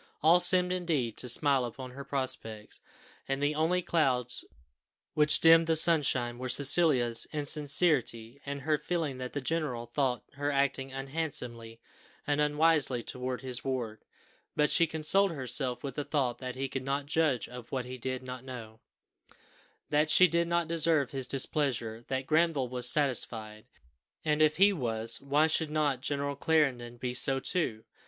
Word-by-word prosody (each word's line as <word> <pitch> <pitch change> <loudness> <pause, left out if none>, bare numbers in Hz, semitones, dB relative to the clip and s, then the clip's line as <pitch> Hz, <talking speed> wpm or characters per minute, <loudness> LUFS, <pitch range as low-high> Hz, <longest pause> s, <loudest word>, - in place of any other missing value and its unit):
All 165 +3 +6
seemed 180 0 +5
indeed 160 -11 -1
to 125 - 0
smile 135 +1 +4
upon 125 +2 -7
her 140 +2 -9
prospects, 130 -6 -4 0.5
and 135 0 -2
the 145 +1 0
only 165 +4 0
clouds 130 -8 0 0.7
which 150 0 +3
dimmed 165 0 +6
the 165 - +2
sunshine 140 -7 +2
were 130 0 -5
Cecilia's 135 -5 +4
insincerity, 145 -5 -1
and 140 0 -6
her 150 +1 0
feeling 160 -7 -3
that 125 0 -6
the 145 - -3
general 130 -5 -2
thought 125 +1 -1
her 145 +1 -3
acting 135 -1 -1
unhandsomely 135 -5 -5 0.5
and 145 0 0
unwisely 150 -4 +2
towards 125 +2 -5
his 125 -2 -2
ward; 120 -5 -4 0.5
but 150 0 +2
she 170 -1 +3
consoled 165 +5 +1
herself 125 -2 -3
with 140 -2 -5
the 145 - -4
thought 130 -5 -1
that 130 -1 -6
he 135 +1 -3
could 135 0 -5
not 140 +1 -2
judge 150 -4 0
of 125 -1 -11
what 130 -2 -3
he 130 0 -8
did 130 +1 -4
not 125 0 -8
know, 115 -4 -10 1.1
that 150 +1 +2
she 185 +3 +7
did 170 -1 0
not 170 -1 0
deserve 160 -4 +1
his 135 -2 -3
displeasure, 125 -5 -1
that 130 0 -3
Granville 155 -4 +1
was 125 0 +1
satisfied, 110 -6 -1 0.6
and 150 0 +1
if 155 0 +3
he 200 +2 +5
was, 115 - -1
why 145 +3 +2
should 160 0 0
not 150 -4 -1
General 140 0 -2
Clarendon 135 -6 0
be 125 0 -4
so 135 +1 +3
too? 130 -8 0
140 Hz, 160 wpm, -29 LUFS, 125-155 Hz, 1.1 s, she